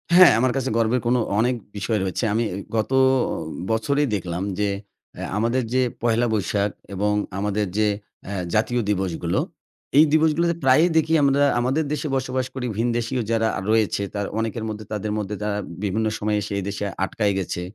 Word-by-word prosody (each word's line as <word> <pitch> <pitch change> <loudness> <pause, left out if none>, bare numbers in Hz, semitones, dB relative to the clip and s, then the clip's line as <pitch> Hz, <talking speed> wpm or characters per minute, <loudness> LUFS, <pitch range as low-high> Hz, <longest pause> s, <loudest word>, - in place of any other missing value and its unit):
হ্যাঁ, 185 0 +9
আমার 130 +1 +3
কাছে 135 -1 -1
গর্বের 115 +2 +2
কোনো 125 +1 +3 0.2
অনেক 125 +3 +2 0.2
বিষয় 105 +2 0
রয়েছে। 95 +4 -2
আমি 115 +2 +1 0.3
গত 110 +3 0 0.8
বছরেই 140 +6 +1
দেখলাম 90 -2 -3 0.2
যে 105 -1 +2 0.5
এ - - -5 0.2
আমাদের 115 +4 +1
যে 130 - +3 0.2
পহেলা 120 0 +2
বৈশাখ 100 0 0 0.2
এবং 105 +2 +1 0.3
আমাদের 105 +1 0
যে 110 0 +3 0.4
এ - - -4 0.2
জাতীয় 120 +3 +2
দিবসগুলো। 95 -4 0 0.6
এই 155 - +9
দিবসগুলোতে 160 +2 +3
প্রায়ই 135 +7 +5
দেখি 160 0 +2
আমরা 140 0 +4 0.2
আমাদের 130 +6 +1
দেশে 150 +1 -2
বসবাস 130 -1 -1
করি 130 -2 -4
ভিন 115 +2 +1
দেশীয় 120 +2 -1
যারা 115 -1 +2 0.2
রয়েছে। 110 -2 +2
তারা 100 -1 -2
অনেকের 115 0 -2
মধ্যে 110 0 -6
তাদের 105 0 -2
মধ্যে 105 -1 -3
তারা 105 -1 -1 0.3
বিভিন্ন 105 +2 0
সময়ে 105 0 0
এসে 100 0 -5
এদেশে 100 +1 -3 0.2
আটকায় 100 +1 0
গেছে। 90 -2 -3
110 Hz, 165 wpm, -23 LUFS, 105-130 Hz, 0.8 s, হ্যাঁ